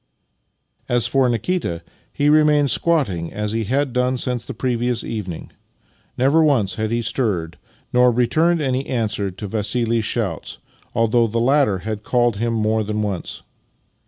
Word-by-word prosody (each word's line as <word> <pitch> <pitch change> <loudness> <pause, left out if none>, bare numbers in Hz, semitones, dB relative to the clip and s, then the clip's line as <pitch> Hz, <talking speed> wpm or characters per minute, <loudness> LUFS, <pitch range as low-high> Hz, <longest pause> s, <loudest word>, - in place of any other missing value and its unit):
As 120 -2 +2
for 135 -2 +2
Nikita, 120 - -2 0.3
he 145 - 0
remained 150 -2 +4
squatting 100 - +1
as 105 0 -3
he 115 0 -1
had 135 +3 0
done 125 +1 +1
since 125 -1 -2
the - - -7
previous 120 -1 -1
evening. 100 -7 -6 0.7
Never 140 +6 +4
once 125 -11 +2
had 110 -1 -2
he 115 +1 -1
stirred, 95 -11 -1 0.4
nor 125 0 +5
returned 155 +8 +2
any 130 0 -1
answer 110 -5 -1
to 95 +3 -8
Vassili's 115 +3 0
shouts, 105 -7 -3 0.4
although 115 +1 +3
the 115 +2 -3
latter 130 -4 +3
had 110 -2 -3
called 120 +1 +1
to 100 - -9
him 115 0 0
more 110 0 +1
than 105 +1 -2
once. 100 -4 -4
115 Hz, 155 wpm, -20 LUFS, 105-130 Hz, 0.7 s, nor